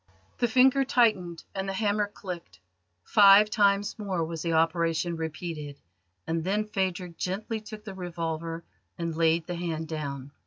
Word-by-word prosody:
The 240 - +3
finger 260 +3 +5
tightened 215 -10 +1
and 195 0 -3
the - - -2
hammer 205 +1 +1
clicked. 175 - -8 0.4
Five 205 - +7
times 205 0 +2
more 190 -5 -1
was 165 -1 -5
the 165 -1 -1
operation 165 +1 +1
repeated, 155 -3 -5 0.5
and 165 0 -1
then 205 +4 0
Phadrig 185 -4 -3
gently 215 +4 -3
took 215 0 -10
the 205 -2 -7
revolver 165 -2 -4 0.3
and 170 -1 -3
laid 165 0 +2
the 175 - -4
hand 165 -2 -3
down. 140 -3 -5
175 Hz, 150 wpm, -28 LUFS, 165-205 Hz, 0.5 s, Five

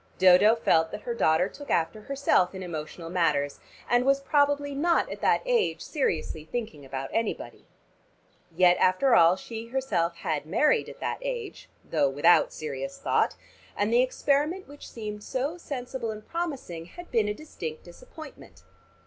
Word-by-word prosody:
Dodo 190 +4 +6
felt 160 -8 +2
that 210 - -8
her 240 - -3
daughter 160 -5 +2
took 285 +7 -11
after 165 +6 0
herself 265 -8 +1
in 190 - -6
emotional 165 0 -6
matters 150 -5 +1 0.3
and 245 0 +3
was 275 +1 +3
probably 285 0 +1
not 335 +5 +1
at - - -7
that - - +2
age 485 -3 +1
seriously 165 - -2
thinking 165 -5 -5
about 135 0 -6
anybody. 225 -1 -3 0.8
Yet 180 +1 +4
after 185 +8 +3
all 170 -1 +6
she 225 +3 -8
herself 205 -10 -1
had 155 -3 -3
married 305 - +2
at - - -13
that - - -2
age - - -5 0.2
(though 145 -4 +2
without 145 +6 +4
serious 135 -3 -5
thought) - - +1 0.4
and 205 +3 +1
the 240 - +6
experiment 290 +7 0
which 290 0 -12
seemed 210 -2 -7
so 280 +9 -3
sensible 255 -5 -5
and 215 0 -7
promising 275 - -4
had 350 - -12
been 220 -3 +2
a - - 0
distinct 165 - -7
disappointment. 285 - -13
215 Hz, 155 wpm, -27 LUFS, 165-275 Hz, 0.8 s, Dodo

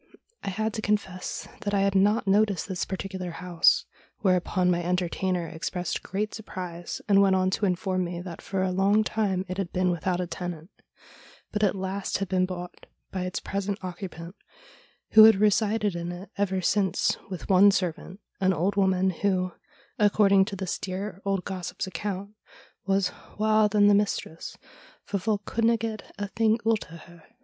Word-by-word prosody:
I - - -2
had 215 +3 -2
to 220 - -3
confess 200 -4 -2
that 205 0 -2
I 195 - +3
had 200 0 +2
not 205 +3 +3
noticed 200 -2 +2
this 185 -3 -2
particular 190 -1 -5
house, 175 0 +2 0.4
whereupon 185 -1 +2
my 175 0 0
entertainer 180 0 -1
expressed 175 +2 -3
great 210 +3 -3
surprise, 180 -5 -6
and 200 -1 +5
went 195 -1 +4
on 185 0 +2
to 205 +1 +1
inform 185 0 0
me 175 0 -5
that 175 -2 -8
for 195 -1 -2
a 185 - 0
long 200 +3 +3
time 200 -4 -1
it 185 +2 -4
had 190 -3 -2
been 185 0 +1
without 175 +1 -1
a 180 - -1
tenant, 175 0 -6 0.8
but 210 - -2
at 205 -1 +3
last 190 +1 -2
had 195 - -3
been 185 0 +1
bought 180 -1 -8 0.2
by 185 -1 -3
its 185 - -3
present 200 0 -3
occupant, 180 -1 -7 0.8
who 220 0 +10
had 220 -1 +8
resided 210 0 +2
in 170 0 -4
it 180 +3 -9
ever 190 -2 0
since 195 +1 +1
with 185 -2 -6
one 195 +1 +7
servant, 185 0 -2 0.2
an 190 -1 +3
old 185 +5 0
woman, 190 -1 +2
who, 185 0 0 0.5
according 200 -2 +5
to 200 - -5
this 190 -2 -3
dear 195 +1 -5
old 195 -2 -1
gossip's 185 -1 -4
account, 195 +2 -4 0.6
was 195 -2 +2
' - - -21
waur 215 0 +4
than 205 0 +4
the 205 - +6
mistress, 200 -5 -1 0.5
for 200 - -2
folk 205 +1 -1
couldna 230 0 +2
get 220 -1 -5
a 205 0 -3
thing 220 +2 +2
oot 225 -6 0
o' - - -9
her.' 170 0 -14
190 Hz, 175 wpm, -27 LUFS, 180-205 Hz, 0.8 s, who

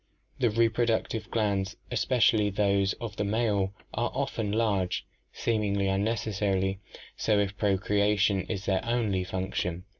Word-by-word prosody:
The 120 -3 +3
reproductive 115 0 +1
glands, 100 -4 0 0.2
especially 110 -4 +3
those 100 -1 +2
of 110 -3 -7
the - - 0
male, 100 -2 +1 0.2
are 120 +2 0
often 125 -6 -1
large, 100 -4 0 0.3
seemingly 105 -3 0
unnecessarily 95 -2 0 0.4
so 105 -2 +1
if 100 -1 0
procreation 100 0 +2
is 100 -3 -3
their 95 -1 +1
only 110 -6 0
func 95 +1 -4
tion. 90 0 -2
105 Hz, 125 wpm, -28 LUFS, 95-110 Hz, 0.4 s, The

